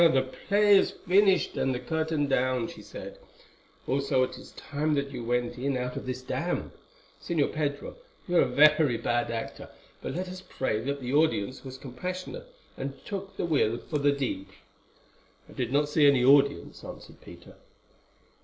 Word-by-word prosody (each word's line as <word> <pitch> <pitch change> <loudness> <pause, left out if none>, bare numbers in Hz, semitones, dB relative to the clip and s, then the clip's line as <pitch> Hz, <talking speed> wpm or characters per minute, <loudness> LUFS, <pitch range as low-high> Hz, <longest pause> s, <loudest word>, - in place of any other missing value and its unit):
"The 135 -6 +4 0.2
play 205 0 +6
is - - +3 0.2
finished 190 0 +4
and 130 -1 +1
the - - -3
curtain 160 -1 -1
down," 130 -3 +1
she - - -10
said; - - -9 0.7
"also 135 -1 +1
it 130 - -3
is - - -12
time 150 +1 -2
that 140 -1 -1
you 125 -3 -5
went 120 +1 -1
in 135 0 0
out 125 0 -3
of - - -6
this 130 0 -4
damp. 175 +6 -2 0.5
Señor 160 -4 0
Pedro, 145 - -3 0.3
you 175 -1 +2
are - - +7
a - - +3
very 150 -1 +5
bad 120 +1 0
actor; 115 -1 -5 0.3
but - - -4
let 185 +2 -3
us 185 0 -8
pray 120 -11 -2
that 140 +4 -3
the 125 +1 -3
audience 145 -6 +1
was 130 -1 -8
compassionate, 180 - -6 0.2
and 135 0 -4
took 195 -1 -6
the - - -1
will 135 -8 +2
for 150 +4 -3
the 145 0 +4
deed." 135 -9 -3 1.0
"I - - -15
did 125 -2 -3
not 145 +2 +2
see 150 0 +4
any 135 -3 +4
audience," 140 -9 +3
answered - - -11
Peter. - - -13
140 Hz, 175 wpm, -28 LUFS, 125-160 Hz, 1.0 s, are